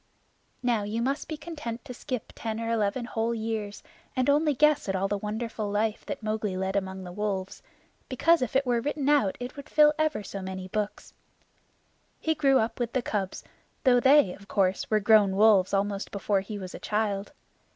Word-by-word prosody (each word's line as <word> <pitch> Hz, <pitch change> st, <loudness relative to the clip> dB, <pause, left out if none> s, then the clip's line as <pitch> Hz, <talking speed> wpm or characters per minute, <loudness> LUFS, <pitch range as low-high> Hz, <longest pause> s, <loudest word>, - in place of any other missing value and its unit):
Now 240 Hz, -3 st, +2 dB
you 210 Hz, +3 st, -3 dB
must 270 Hz, +4 st, -1 dB
be 310 Hz, -, -5 dB
content 295 Hz, -7 st, -6 dB
to 255 Hz, -, -7 dB
skip 250 Hz, -1 st, -5 dB
ten 220 Hz, -1 st, -4 dB
or 230 Hz, 0 st, -2 dB
eleven 225 Hz, +2 st, 0 dB
whole 230 Hz, 0 st, -1 dB
years, 220 Hz, -2 st, -4 dB, 0.3 s
and 255 Hz, +1 st, +3 dB
only 300 Hz, 0 st, +2 dB
guess 300 Hz, -5 st, +3 dB
at 190 Hz, -, 0 dB
all 190 Hz, +1 st, 0 dB
the 205 Hz, -, -1 dB
wonderful 215 Hz, 0 st, -3 dB
life 210 Hz, +1 st, -1 dB
that 280 Hz, -5 st, -5 dB
Mowgli 215 Hz, -3 st, -2 dB
led 190 Hz, +1 st, -2 dB
among 190 Hz, -1 st, -2 dB
the 180 Hz, -, -8 dB
wolves, 195 Hz, -1 st, -3 dB, 0.5 s
because 330 Hz, +5 st, +3 dB
if 255 Hz, 0 st, -2 dB
it 270 Hz, +1 st, +3 dB
were 240 Hz, -2 st, +1 dB
written 285 Hz, +1 st, -2 dB
out 280 Hz, -10 st, +3 dB
it 245 Hz, +1 st, -6 dB
would 280 Hz, -1 st, -10 dB
fill 300 Hz, -1 st, +6 dB
ever 310 Hz, -8 st, 0 dB
so 195 Hz, 0 st, -6 dB
many 185 Hz, 0 st, -6 dB
books. 210 Hz, +2 st, -4 dB, 1.1 s
He 320 Hz, -, +1 dB
grew 275 Hz, -4 st, +3 dB
up 225 Hz, 0 st, -1 dB
with 240 Hz, -1 st, -2 dB
the 255 Hz, -, 0 dB
cubs, 195 Hz, -4 st, -3 dB, 0.4 s
though 250 Hz, -2 st, +5 dB
they, 265 Hz, -7 st, +5 dB
of 200 Hz, -, -14 dB
course, 190 Hz, -2 st, 0 dB
were 215 Hz, -, +3 dB
grown 210 Hz, -2 st, +5 dB
wolves 205 Hz, -2 st, +5 dB
almost 200 Hz, 0 st, -1 dB
before 200 Hz, 0 st, 0 dB
he 205 Hz, +2 st, -6 dB
was 185 Hz, -2 st, -7 dB
a -, -, -7 dB
child. 210 Hz, 0 st, -1 dB
220 Hz, 195 wpm, -27 LUFS, 200-255 Hz, 1.1 s, fill